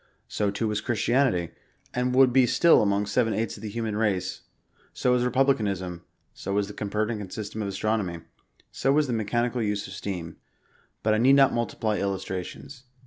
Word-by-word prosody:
So 105 -1 -1
too 105 +3 -2
was 105 -1 -1
Christianity, 115 -6 +1 0.4
and 125 0 0
would 130 -2 +5
be 130 -1 +5
still 170 +7 +5
among 100 0 +1
seven 115 +1 +1
eighths 115 0 -2
of - - -12
the 110 - -5
human 110 0 -3
race, 100 -4 -1 0.3
— - - -36
so 125 - +1
was 125 0 +3
republicanism, 105 -9 0 0.3
so 100 - -5
was 100 0 +2
the 105 - -8
Copernican 105 0 -2
system 110 +2 -5
of 100 - -2
astronomy, 95 -3 -2 0.5
so 135 - 0
was 150 +1 +3
the 125 - -2
mechanical 120 +2 0
use 105 -2 -1
of 95 - -9
steam; 90 -4 -5 0.3
— - - -32
^but 110 - +4
I 110 - +2
need 130 +4 +5
not 135 -1 +5
mukiply 110 -1 -1
illustrations. 100 +6 -5
110 Hz, 185 wpm, -26 LUFS, 100-125 Hz, 0.5 s, would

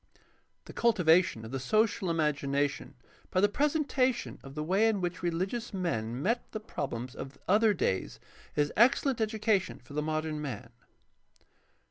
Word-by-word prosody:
The - - -10
cultivation 180 - +3
of 110 - -8
the 135 - -2
social 210 - +1
imagination 145 -3 0 0.3
by 185 - +1
the 205 - +5
presentation 280 0 0
of 135 0 -11
the 150 - -2
way 195 +7 +3
in 220 -3 +1
which 175 -1 -3
reHgious 190 +7 -2
men 120 -10 -2
met 235 +6 -1
the 215 - -3
problems 130 - -5
of 140 0 -8
other 215 +4 +5
days 95 - -1 0.4
is 145 0 +1
excellent 250 +2 +3
education 215 -2 0
for - - -15
the 150 - 0
modern 155 0 -2
man. 115 -5 -6
175 Hz, 145 wpm, -30 LUFS, 145-220 Hz, 0.4 s, the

